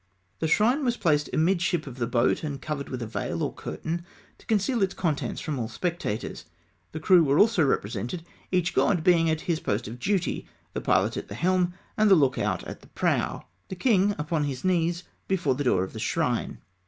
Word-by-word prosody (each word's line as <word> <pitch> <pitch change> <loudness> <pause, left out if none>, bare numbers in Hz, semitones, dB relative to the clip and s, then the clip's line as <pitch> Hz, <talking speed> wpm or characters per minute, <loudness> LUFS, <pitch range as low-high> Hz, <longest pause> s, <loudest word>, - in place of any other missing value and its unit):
The 160 - 0
shrine 235 - +3
was 245 -2 +1
placed 150 -4 +1
amidship 175 0 +1
of 130 -2 -9
the 120 - 0
boat, 120 +4 +1
and 145 -3 -4
covered 140 0 -4
with 125 -2 -4
a - - -3
veil, 110 - -3
or - - -2
curtain, 170 +2 -4 0.4
to - - -21
conceal 220 +2 +1
its 195 -1 +1
contents 160 -6 -1
from 150 -4 -3
all 115 - -2
spectators. 170 - -3 0.5
The 160 - -5
crew 175 +2 +6
were 140 -1 +2
also 210 -4 +5
represented, 135 - -1 0.3
each 180 -1 +1
god 180 -6 +2
being 165 -2 +4
at 160 0 0
his 165 -3 -1
post 100 -4 -2
of 115 +3 -8
duty, 190 +5 -1 0.3
the - - -3
pilot - - +2
at - - -5
the 100 - -7
helm, 180 +5 +1 0.2
the 215 -2 +6
look 135 -6 +2
out - - -1
at - - -8
the - - -17
prow, - - -1 0.2
the 190 - -6
king 205 -1 +3
upon 150 0 -1
his 135 -3 -4
knees 175 -1 +1 0.2
before 175 -8 +1
the 140 +2 -3
door 95 -7 +3
of 95 - -7
the - - -6
shrine. - - -1
165 Hz, 205 wpm, -26 LUFS, 140-185 Hz, 0.5 s, crew